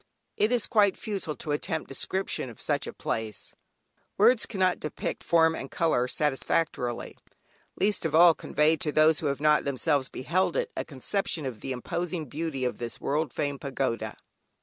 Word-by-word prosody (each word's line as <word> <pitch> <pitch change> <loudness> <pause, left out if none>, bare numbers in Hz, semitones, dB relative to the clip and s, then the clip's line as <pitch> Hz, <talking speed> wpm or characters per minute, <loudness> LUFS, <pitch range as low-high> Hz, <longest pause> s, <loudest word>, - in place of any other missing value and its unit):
It 215 - +2
is 245 -3 +2
quite 205 -5 +3
futile 195 -8 -4
to 150 - -5
attempt 155 +2 -2
description 160 -1 -2
of 115 - -13
such - - 0
a - - -4
place; 110 -3 -4 0.6
words 230 +3 +5
cannot 185 -4 +1
depict 155 - -4
form 160 -1 +4
and 135 - -6
colour 140 -7 +1
satisfactorily, 135 -3 -1 0.6
least 205 0 +2
of 160 -2 0
all 170 0 +8
convey 155 +1 +1
to 150 0 -1
those 155 +1 +4
who 155 - -1
have 140 -1 -1
not 150 0 +4
themselves 140 0 0
beheld 175 +8 0
it, - - -1
a - - -2
conception 155 +3 -2
of 125 -5 -5
the 135 - -5
imposing 165 +6 -3
beauty 145 -1 -3
of 125 -3 -2
this 120 -1 -5
world 150 -1 -1
famed 145 +1 -3
Pagoda. 115 -5 -2
155 Hz, 170 wpm, -28 LUFS, 135-175 Hz, 0.6 s, all